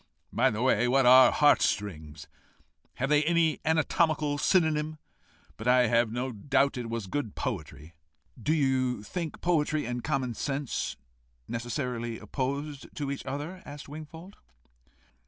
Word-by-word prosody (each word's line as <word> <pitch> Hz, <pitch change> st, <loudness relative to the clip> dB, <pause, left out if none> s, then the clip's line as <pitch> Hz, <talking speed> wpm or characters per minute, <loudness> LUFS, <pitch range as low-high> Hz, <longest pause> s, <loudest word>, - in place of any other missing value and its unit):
By -, -, +3 dB
the 110 Hz, +3 st, -2 dB
way, 125 Hz, -2 st, +3 dB
what 135 Hz, +1 st, +3 dB
are 130 Hz, +1 st, +9 dB
the -, -, +2 dB
heart 150 Hz, -1 st, +5 dB
strings? 80 Hz, -6 st, -2 dB, 0.7 s
Have 135 Hz, +2 st, -2 dB
they 150 Hz, 0 st, +4 dB
any 165 Hz, 0 st, +2 dB
anatomical 155 Hz, -2 st, +1 dB
synonym? 155 Hz, -3 st, +1 dB, 0.6 s
But 110 Hz, -, -6 dB
I 125 Hz, 0 st, +5 dB
have 115 Hz, -1 st, +2 dB
no 125 Hz, +3 st, -2 dB
doubt 140 Hz, +5 st, +1 dB
it 120 Hz, -2 st, -5 dB
was 115 Hz, -3 st, -3 dB
good 110 Hz, +1 st, -4 dB
poetry." 80 Hz, -, -5 dB, 0.5 s
"Do 150 Hz, -, 0 dB
you 130 Hz, -6 st, +1 dB
think 165 Hz, -, -5 dB
poetry 155 Hz, -4 st, +1 dB
and 120 Hz, 0 st, -4 dB
common 135 Hz, -5 st, -1 dB
sense 140 Hz, +2 st, -3 dB, 0.5 s
necessarily 120 Hz, -1 st, -3 dB
opposed 140 Hz, +2 st, -4 dB
to 145 Hz, -2 st, -3 dB
each 140 Hz, -, -5 dB
other?" 150 Hz, +7 st, -5 dB
asked 145 Hz, 0 st, -10 dB
Wingfold. 160 Hz, +6 st, -10 dB
135 Hz, 140 wpm, -28 LUFS, 120-150 Hz, 0.7 s, are